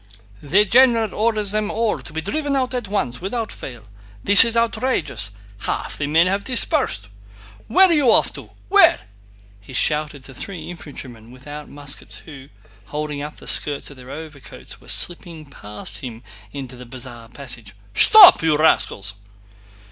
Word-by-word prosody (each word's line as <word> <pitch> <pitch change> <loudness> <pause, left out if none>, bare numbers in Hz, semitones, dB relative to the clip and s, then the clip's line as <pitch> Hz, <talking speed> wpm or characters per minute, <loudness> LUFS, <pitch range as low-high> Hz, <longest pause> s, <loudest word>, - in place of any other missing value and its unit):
"The 190 +9 +2
general 230 -2 +3
orders 215 -2 0
them 215 0 -1
all 225 -1 -1
to - - -10
be 160 +1 -4
driven 290 - -2
out 260 -1 -1
at 245 -4 -3
once, 185 - -3
without 220 +4 -4
fail. 120 -4 -10 0.4
This 200 -1 +10
is 230 0 0
outrageous! 220 - -1 0.3
Half - - -5
the 145 - -2
men 160 +3 +3
have 195 +2 -1
dispersed." 255 -2 +1 0.6
"Where 380 +1 +5
are 345 - +2
you 290 -6 +2
off - - +3
to?... - - -11 0.2
Where?..." 380 -4 +5 0.6
he 100 +6 -15
shouted 150 +1 -1
to 135 - -12
three 180 +6 -7
infantrymen 130 -9 -11
without 145 +4 -11
muskets 145 0 -6
who, 140 -3 -13 0.4
holding 150 -1 -5
up 150 +1 -8
the - - -15
skirts 145 -1 +1
of 140 - -15
their 125 0 -14
overcoats, 155 -3 -11
were - - -20
slipping 170 -3 -1
past 105 -7 -9
him 120 -4 -9 0.3
into 130 -3 -8
the 125 0 -12
Bazaar 120 -2 -7
passage. 120 -6 -6 0.2
"Stop, 420 - +8
you 160 -2 +1
rascals!" 105 -9 +1
150 Hz, 160 wpm, -20 LUFS, 130-215 Hz, 0.6 s, This